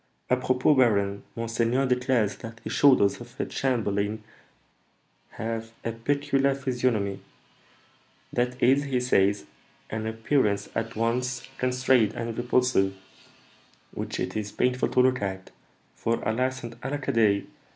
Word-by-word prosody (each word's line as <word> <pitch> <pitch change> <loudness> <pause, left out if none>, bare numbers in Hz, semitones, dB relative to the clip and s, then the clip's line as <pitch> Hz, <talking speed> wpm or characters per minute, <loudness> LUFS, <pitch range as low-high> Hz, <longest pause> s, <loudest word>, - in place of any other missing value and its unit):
"Apropos, 130 +2 +3
baron; 100 -6 +2
monseigneur 115 +3 0
declares 125 -4 +1
that 115 0 -9
the - - -5
shoulders 130 -7 +4
of 120 0 -13
a - - 0
chamberlain 110 -4 -1 1.1
have 115 0 -4 0.2
a 115 - 0
peculiar 140 +3 +1
physiognomy: 125 -7 -1 1.1
that 125 0 -1
is, 135 +3 +4
he 130 -2 0
says, 100 -8 +2 0.5
an 110 0 -3
appearance 110 -1 0
at 115 0 -3
once 125 +3 -1
constrained 125 -3 +2
and 115 -1 -4
repulsive, 120 -5 +2 1.0
which - - -5
it - - -3
is 105 -1 -3
painful 125 0 +1
to 125 - +3
look 130 -1 +2
at; 95 -1 -4 0.4
for, 115 - 0
alas 130 +3 -1
and 115 +1 -9
alackaday! 130 -7 +1
120 Hz, 120 wpm, -26 LUFS, 110-130 Hz, 1.1 s, shoulders